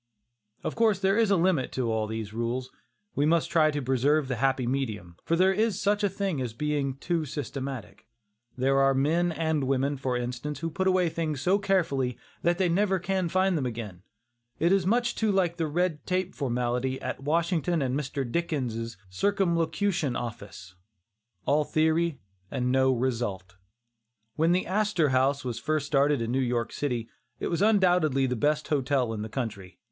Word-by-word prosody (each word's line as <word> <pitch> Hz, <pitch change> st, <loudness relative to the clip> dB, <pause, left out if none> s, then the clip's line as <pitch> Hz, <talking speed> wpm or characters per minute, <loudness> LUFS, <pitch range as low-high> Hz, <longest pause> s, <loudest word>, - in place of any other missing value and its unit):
Of -, -, -2 dB
course 225 Hz, -4 st, +3 dB
there 195 Hz, +1 st, +2 dB
is 225 Hz, -2 st, +3 dB
a 200 Hz, -, +4 dB
limit 170 Hz, -6 st, +1 dB
to 125 Hz, -3 st, -1 dB
all 110 Hz, -1 st, 0 dB
these 110 Hz, -1 st, -5 dB
rules. 120 Hz, +3 st, -3 dB, 0.4 s
We 145 Hz, +1 st, +1 dB
must 165 Hz, 0 st, +2 dB
try 155 Hz, -2 st, +4 dB
to 145 Hz, -2 st, -2 dB
preserve 135 Hz, +3 st, +2 dB
the 125 Hz, -, -1 dB
happy 130 Hz, 0 st, +1 dB
medium, 110 Hz, -9 st, -3 dB
for 165 Hz, -, +2 dB
there 190 Hz, +2 st, +4 dB
is 215 Hz, -1 st, +1 dB
such 205 Hz, +1 st, +1 dB
a 205 Hz, -, +3 dB
thing 190 Hz, -6 st, -2 dB
as 120 Hz, -4 st, -3 dB
being 145 Hz, +1 st, -1 dB
too 165 Hz, +4 st, -1 dB
systematic. 135 Hz, -4 st, -6 dB, 0.5 s
There 135 Hz, +2 st, +2 dB
are 135 Hz, 0 st, +4 dB
men 165 Hz, +6 st, +2 dB
and 160 Hz, -3 st, 0 dB
women, 135 Hz, +2 st, 0 dB
for 130 Hz, -2 st, -1 dB
instance, 125 Hz, +4 st, -4 dB
who 165 Hz, 0 st, -2 dB
put 190 Hz, +4 st, -1 dB
away 185 Hz, -1 st, +3 dB
things 155 Hz, -4 st, -3 dB
so 190 Hz, +5 st, +3 dB
carefully 155 Hz, -, 0 dB, 0.2 s
that 175 Hz, +1 st, +2 dB
they 190 Hz, -, +2 dB
can 170 Hz, -, +1 dB
never 190 Hz, 0 st, +2 dB, 0.3 s
find 185 Hz, +1 st, +2 dB
them 140 Hz, -5 st, 0 dB
again. 110 Hz, -7 st, -6 dB, 0.6 s
It 170 Hz, +2 st, +2 dB
is 195 Hz, -2 st, +3 dB
too -, -, +2 dB
much 240 Hz, +1 st, +1 dB
like 190 Hz, -5 st, +2 dB
the 165 Hz, -2 st, 0 dB
"red 165 Hz, -1 st, -1 dB
tape" 185 Hz, 0 st, -1 dB
formality 125 Hz, 0 st, -1 dB
at -, -, -5 dB
Washington 165 Hz, +1 st, +1 dB
and 130 Hz, -1 st, -1 dB
Mr. 140 Hz, -1 st, -2 dB
Dickens' 120 Hz, -, -2 dB
"Circumlocution 170 Hz, -, 0 dB
Office," 105 Hz, -6 st, -7 dB, 0.7 s
all 150 Hz, +2 st, +3 dB
theory 160 Hz, 0 st, +1 dB, 0.3 s
and 125 Hz, 0 st, -1 dB
no 130 Hz, 0 st, +4 dB
result. 115 Hz, -8 st, -2 dB, 0.8 s
When 165 Hz, +2 st, +2 dB
the 180 Hz, +1 st, +2 dB
"Astor 195 Hz, -5 st, +1 dB
House" 135 Hz, +2 st, +1 dB
was 120 Hz, -2 st, -3 dB
first 155 Hz, +2 st, -1 dB
started 140 Hz, -2 st, +2 dB
in 115 Hz, -, -2 dB
New 130 Hz, -, +1 dB
York 120 Hz, -2 st, 0 dB
City, 120 Hz, -6 st, -2 dB, 0.3 s
it -, -, -2 dB
was 170 Hz, +1 st, -1 dB
undoubtedly 180 Hz, -10 st, +3 dB
the 125 Hz, -1 st, -1 dB
best 150 Hz, +6 st, 0 dB
hotel 135 Hz, -5 st, +1 dB
in 105 Hz, -, -4 dB
the 110 Hz, -, -5 dB
country. 105 Hz, -7 st, -5 dB
145 Hz, 180 wpm, -27 LUFS, 125-175 Hz, 0.8 s, a